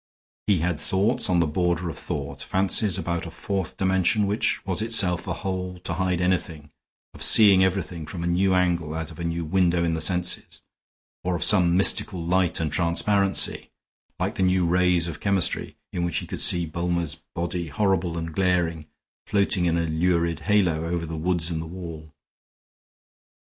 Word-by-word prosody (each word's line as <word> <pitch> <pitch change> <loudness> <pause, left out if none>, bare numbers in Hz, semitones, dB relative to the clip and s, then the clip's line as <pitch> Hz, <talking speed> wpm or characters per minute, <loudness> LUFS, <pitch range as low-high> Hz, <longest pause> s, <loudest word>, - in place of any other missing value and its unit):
He 100 -6 +3
had 85 -2 -1
thoughts 105 +9 0
on 90 -1 +3
the - - +3
border 85 +2 0
of 80 - -4
thought; - - -5
fancies 95 +1 +1
about 85 -1 -3
a - - -6
fourth 95 +2 -4
dimension 95 +2 +2
which 100 +3 0
was 95 +2 0
itself 100 -6 +1
a 90 - -1
hole 90 0 -4
to 85 - -2
hide 90 0 0
anything, 85 -5 -2 0.4
of - - -13
seeing 100 -4 +6
everything 90 -4 -2
from 85 -3 -6
a - - -2
new 90 +2 +2
angle 85 -4 0
out 80 0 -4
of 80 - -13
a - - -4
new 85 0 -2
window 85 0 +2
in 85 -1 0
the 80 - -2
senses; 90 +2 -1 0.6
or 90 0 0
of 85 - -1
some 90 -4 +4
mystical 100 0 +2
light 90 0 +1
and 80 -3 -1
transparency, 95 +4 0 0.5
like - - -1
the - - -4
new 90 -1 +3
rays 90 0 +2
of 80 -3 -6
chemistry, 100 -3 -1 0.2
in 85 - -2
which 85 - -1
he - - -2
could - - -6
see 85 -1 +2
Bulmer's 85 -1 -2
body, 85 0 -3
horrible 90 +1 0
and 80 -1 -5
glaring, 85 -4 0 0.4
floating 100 -3 +2
in 85 -1 +1
a 85 - 0
lurid 85 +1 0
halo 90 -7 +1
over 85 -1 -2
the 80 0 -6
woods 85 +1 0
and 80 -1 -2
the 80 - -7
wall. 80 -3 -8
90 Hz, 180 wpm, -24 LUFS, 85-95 Hz, 0.6 s, seeing